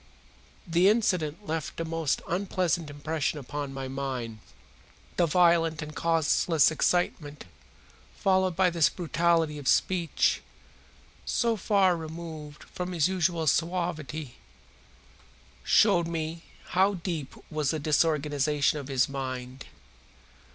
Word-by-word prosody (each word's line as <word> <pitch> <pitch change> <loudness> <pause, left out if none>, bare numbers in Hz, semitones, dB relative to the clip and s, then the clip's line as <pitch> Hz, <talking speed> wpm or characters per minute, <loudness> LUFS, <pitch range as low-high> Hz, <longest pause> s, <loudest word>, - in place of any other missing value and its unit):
The 175 +2 +4
incident 185 -5 0
left 160 -2 -4
a 165 - -2
most 165 -3 -1
unpleasant 175 -3 -1
impression 150 +1 -2
upon 145 0 -5
my 135 -1 -5
mind. 130 -4 -4 0.8
The 175 - +2
violent 165 -2 +3
and 150 0 -9
causeless 165 -1 +3
excitement, 155 - -1 0.7
followed 190 -2 +1
by 185 0 +3
this 165 -2 +3
brutality 165 -3 0
of 140 - -7
speech, 175 -3 +2 0.8
so 235 -1 +1
far 195 -3 +3
removed 160 -2 -8
from 180 0 -6
his 165 -3 +2
usual 175 -3 0
suavity, 160 -5 -1 1.3
showed 185 -6 +4
me 165 0 -4 0.2
how 195 +2 +3
deep 165 -6 -5 0.2
was 155 -3 -1
the 160 - 0
disorganization 150 -1 +1
of 140 - -8
his 130 -2 +2
mind. 130 -1 -6
160 Hz, 110 wpm, -28 LUFS, 145-175 Hz, 1.3 s, The